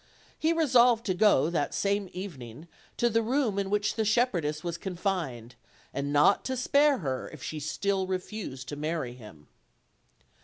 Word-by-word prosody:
He 320 - +2
resolved 250 -7 +4
to 185 - +1
go 180 -6 +4
that 155 -4 -1
same 200 -1 0
evening 155 - -8 0.3
to 240 - +3
the 230 0 +2
room 230 -3 0
in 195 -1 -2
which 210 +1 +1
the 220 - 0
shepherdess 190 -10 +1
was 170 -1 -3
confined, 170 - -3 0.4
and 140 +1 -2
not 150 +7 +4
to 260 0 -2
spare 280 +3 +3
her 135 - -3
if 155 -4 -11
she 155 - -4
still 190 +5 -1
refused 185 - -5
to 145 - -4
marry 155 -4 -3
him. 105 -12 -14
185 Hz, 160 wpm, -28 LUFS, 145-220 Hz, 0.4 s, resolved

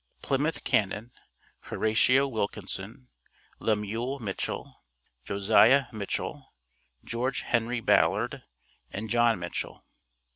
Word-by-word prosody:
PLYMOUTH 145 +4 0
CANNON, 105 +3 0 0.5
HORATIO 125 +5 +3
WILKINSON, 105 +1 -4 0.5
LEMUEL 110 +5 -1
MITCHELL, 105 -7 -5 0.4
JOSIAH 110 +7 +4
MITCHELL, 105 -3 -4 0.5
GEORGE 125 +2 -1
HENRY 120 0 0
BALLARD, - - +2 0.5
AND 110 +2 -5
JOHN 120 -2 +4
MITCHELL. 85 -1 -5
115 Hz, 80 wpm, -28 LUFS, 105-125 Hz, 0.5 s, JOSIAH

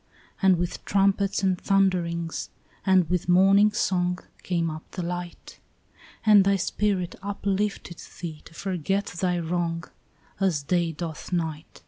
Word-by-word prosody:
And 190 -2 +5
with 175 0 -3
trumpets 195 0 +2
and 185 -2 +1
thunderings 175 -4 0 0.3
and 190 -3 +4
with 180 0 -1
morning 195 +3 +6
song 180 -3 0 0.2
Came 170 -2 -1
up 155 +1 -7
the 180 - -3
light; 175 0 -6 0.7
And 210 -2 +7
thy 200 +1 +3
spirit 190 0 -1
uplifted 200 -2 -2 0.2
thee 160 -3 -6
to 165 - -15
forget 195 +2 -1
thy 180 -1 +1
wrong 170 0 -1 0.6
As 180 -7 +1
day 170 +2 +1
doth 160 +2 -6
night. 160 -3 -3
180 Hz, 130 wpm, -26 LUFS, 170-195 Hz, 0.7 s, And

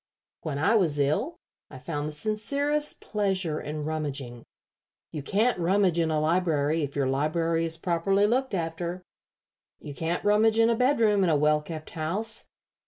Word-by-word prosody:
When 145 -3 -4
I 160 +9 +2
was 175 -9 +2
ill 155 - 0 0.3
I - - -10
found 150 +2 -4
sincerest 280 - 0
pleasure 190 -7 -1
in 150 0 -5
rummaging. 140 -6 -4 0.7
You 150 - -5
can't 210 - +1
rummage 180 0 +2
in 165 -1 +1
a 155 -1 +1
library 160 -1 +1
if 140 -2 -4
your 140 -2 +1
library 165 +5 0
is 165 0 0
properly 185 +4 +1
looked 250 +1 0
after. 170 +1 -4 0.8
You 145 - -8
can't 165 +6 -3
rummage 215 +2 +3
in 230 +1 +4
a - - +2
bedroom 225 -5 +3
in 180 - +2
a 155 - +3
well 150 +1 +2
kept 155 0 -8
house. 190 +8 -1
165 Hz, 160 wpm, -26 LUFS, 150-210 Hz, 0.8 s, in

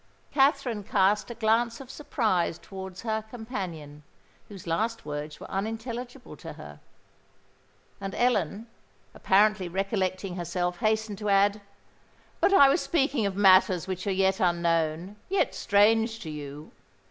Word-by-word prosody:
Katherine 270 -6 +2
cast 200 +3 +2
a 235 - -6
glance 230 +1 +1
of 270 -1 -10
surprise 210 - -1
towards 190 0 -9
her 220 -1 -1
companion, 185 - -7 0.5
whose 195 -4 -11
last 220 +7 -2
words 150 0 -6
were - - -9
unintelligible 235 +5 -5
to - - -9
her; - - -11 1.2
and 195 0 -5
Ellen, 220 -4 0 0.5
apparently 200 -1 +2
recollecting 190 0 -2
herself, 175 0 -2
hastened 215 -2 0
to 210 -1 -2
add, 200 +1 +3 0.8
"But - - +3
I 335 -9 +8
was 275 +6 +2
speaking 270 -8 +1
of 195 - -4
matters 185 -2 +5
which 185 +1 -4
are - - +1
yet 190 0 +1
unknown—yet 170 - 0
strange 225 +3 +3
to 160 - -6
you. 145 0 -8
200 Hz, 130 wpm, -27 LUFS, 180-225 Hz, 1.2 s, I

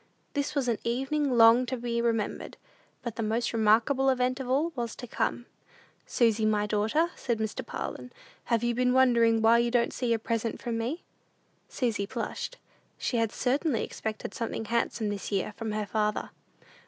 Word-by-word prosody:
This 285 0 -2
was 275 -3 0
an 230 -3 0
evening 270 +2 0
long 230 +2 +7
to 260 - -2
be 235 0 -1
remembered; 225 -3 -2 0.5
but 235 -3 -5
the - - -1
most 225 +3 0
remarkable 230 +5 +3
event 255 0 +1
of 260 -2 -5
all 295 +6 +2
was 235 -3 -3
to - - -8
come. 240 0 -2 0.6
"Susy, 225 -2 +2
my 210 -1 +2
daughter," 220 +11 +1
said 235 -3 -2
Mr. 220 -1 -3
Parlin, 250 - -6 0.4
"have 235 -1 +1
you 240 0 +1
been 250 +1 +2
wondering 235 -3 +4
why 230 +1 +6
you 235 0 +2
don't 235 -1 +1
see 245 -2 -1
a 230 - +3
present 230 0 -2
from 235 -1 -3
me?" 240 +9 -3 0.7
Susy 225 -6 -1
blushed. - - -4 0.4
She 245 - -1
had 225 -2 +1
certainly 265 -1 0
expected 215 -2 -5
something 225 -1 -3
handsome 230 -1 -1
this 205 0 -4
year 200 +1 -1
from 225 -2 -4
her 210 0 -2
father. 210 +1 -1
235 Hz, 175 wpm, -28 LUFS, 220-250 Hz, 0.7 s, long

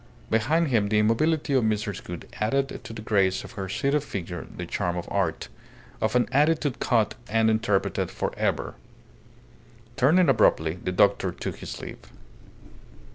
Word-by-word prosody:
Behind 150 +9 +2
him 110 -5 +2
the 105 - +2
immobility 140 +8 +2
of 130 -3 +3
Mrs. 105 -2 -1
Gould 90 -1 -7
added 135 +6 -1
to - - -7
the 110 -1 -8
grace 95 -4 +2
of - - -10
her 100 -6 -6
seated 140 +7 0
figure 90 - -6
the 90 - -6
charm 90 0 -2
of 85 - -5
art, - - -1 0.5
of 110 +2 0
an 125 - +3
attitude 150 0 +2
caught 115 -3 +2 0.2
and 110 +1 +3
interpreted 110 -3 0
for - - -3
ever. - - -1 1.2
Turning 160 +7 +4
abruptly, 100 - +3
the 90 - -1
doctor 90 - +3
took - - -6
his - - -7
leave. - - -8
110 Hz, 155 wpm, -26 LUFS, 100-135 Hz, 1.2 s, Turning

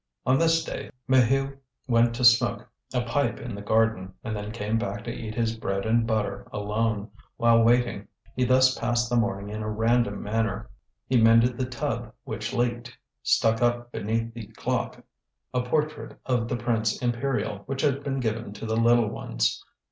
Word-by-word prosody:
On 130 +2 +3
this 165 0 +3
day - - -6 0.2
Maheu 135 +2 +3 0.3
went 115 -1 +3
to 125 - -3
smoke 120 -1 +4 0.2
a 125 -1 0
pipe 120 +4 0
in 120 -2 -6
the 100 - -6
garden, 110 -3 +1
and 110 -1 -3
then 105 0 -5
came 110 0 -1
back 105 -2 -4
to 120 - -4
eat 110 -1 -6
his 115 -1 0
bread 100 -3 -2
and 115 +1 +2
butter 110 -2 -1
alone, 105 +1 -1 0.3
while 115 -1 +5
waiting. 120 -3 +2 0.3
He 125 - +1
thus 130 +1 +4
passed 120 +1 0
the - - +2
morning 105 -4 0
in 105 +1 -4
a 110 - -3
random 115 -1 +1
manner; 110 +1 -2 0.3
he 125 -3 +3
mended 115 +2 +5
the 130 +1 -2
tub, 125 -2 -3
which - - -4
leaked; 120 0 -2 0.2
stuck 115 0 +2
up 120 0 +1
beneath 115 +2 -2
the 115 -3 -8
clock - - -3 0.5
a 125 - +1
portrait 150 +4 -2
of 120 -3 0
the 120 - -2
prince 115 -2 0
imperial 125 -3 -1
which 135 0 -2
had 140 -1 +1
been 135 -1 -2
given 115 -3 -2
to 105 - -7
the 110 0 -1
little 115 0 +4
ones. - - -1
115 Hz, 180 wpm, -26 LUFS, 110-125 Hz, 0.5 s, while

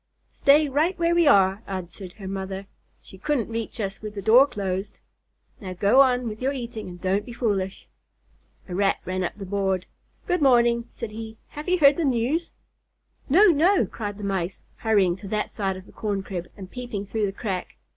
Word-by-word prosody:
"Stay 290 +2 +4
right 310 +7 +1
where 340 0 +2
we 340 -2 +4
are," 195 -5 +5
answered 185 -1 -6
her 195 -3 -9
mother. 195 0 -4 0.4
"She 190 - -13
couldn't 280 -2 -1
reach 230 +1 -4
us 195 -2 -3
with 210 -1 -7
the 200 - -4
door 240 +7 +7
closed. 200 -5 -4 0.6
Now 190 -5 -6
go 205 +8 +5
on 250 -2 +3
with 215 +1 -6
your 270 +2 0
eating 235 -6 -6
and 175 0 -10
don't 190 +3 0
be 240 - -9
foolish." 200 -6 -2 0.8
A 180 - -6
Rat 195 +2 +2
ran 185 0 -2
up 180 - -4
the 195 - -7
board. 190 -1 -1 0.4
"Good 360 -2 0
morning," 235 -3 +4
said 230 -3 -7
he. 220 0 -8
"Have 300 +4 -6
you 365 - +3
heard 285 -3 +6
the 335 - 0
news?" 270 +6 0 0.8
"No, 380 +9 +7
no!" 345 +5 +4
cried 205 -3 -6
the 210 - -8
Mice, 190 -2 -2 0.2
hurrying 200 -6 +2
to 195 - -10
that 210 +1 -2
side 195 -2 -2
of 185 - -11
the - - -16
corn 205 -3 -3
crib, 180 -3 -5
and 190 -2 -9
peeping 240 -5 -5
through 210 +1 -1
the - - -3
crack. 195 -2 -4
210 Hz, 195 wpm, -25 LUFS, 195-255 Hz, 0.8 s, door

